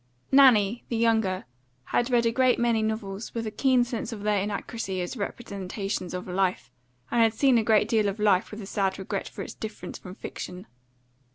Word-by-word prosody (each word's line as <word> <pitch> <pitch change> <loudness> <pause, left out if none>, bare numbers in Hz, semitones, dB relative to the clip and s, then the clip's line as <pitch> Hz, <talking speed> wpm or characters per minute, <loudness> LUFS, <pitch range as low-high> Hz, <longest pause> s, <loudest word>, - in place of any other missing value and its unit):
Nanny, 240 -5 +5
the 235 - -1
younger, 220 -5 +1 0.4
had 240 - 0
read 240 -2 +3
a 230 - +3
great 255 +1 +3
many 235 -2 +2
novels 215 -1 -4
with 230 -1 -2
a 215 - -3
keen 255 +2 +3
sense 240 -1 -4
of 210 -3 -7
their 210 -1 +2
inaccuracy 200 -1 -3
as 180 +7 -3
representations 200 -4 -4
of 180 - -5
life, 180 -8 -1 0.4
and 235 - +3
had 225 -1 +3
seen 260 -1 +4
a - - 0
great 215 -1 +3
deal 220 -3 +2
of 200 - -5
life 210 -1 +3
with 215 0 -8
a - - -7
sad 195 -1 -1
regret 195 0 -4
for - - -7
its - - -8
difference 220 -1 -7
from 185 -1 -10
fiction. 180 0 -7
215 Hz, 195 wpm, -27 LUFS, 195-230 Hz, 0.4 s, Nanny